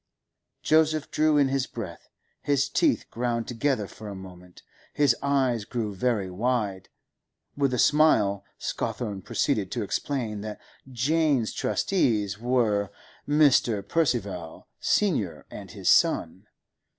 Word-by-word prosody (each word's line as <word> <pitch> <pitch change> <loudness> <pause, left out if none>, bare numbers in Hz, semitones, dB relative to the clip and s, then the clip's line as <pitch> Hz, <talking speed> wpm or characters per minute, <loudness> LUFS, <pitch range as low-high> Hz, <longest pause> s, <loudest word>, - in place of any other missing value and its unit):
Joseph 155 -1 +2
drew 155 -1 +3
in 140 -2 +4
his 135 -1 0
breath; 95 -8 -8 0.3
his 140 -1 +1
teeth 295 - +1
ground 120 -1 -2
together 125 -2 0
for 105 +2 -11
a 100 - -6
moment; 90 -1 -12 0.3
his 145 -5 +4
eyes 130 -5 +1
grew 105 -1 -3
very 105 -1 0
wide. 100 -1 -2 0.7
With 140 -2 +1
a 125 - -1
smile 110 -10 +3
Scawthorne 105 -5 -4
proceeded - - -1
to - - -2
explain 115 -7 -3
that 105 0 -6 0.3
Jane's 140 -1 +1
trustees 110 - 0
were 115 -5 +1 0.4
Mr. 135 -8 +3
Percival, 100 - -1
senior, 145 - 0
and - - -9
his - - -7
son. 95 +5 +2
120 Hz, 120 wpm, -26 LUFS, 100-140 Hz, 0.7 s, in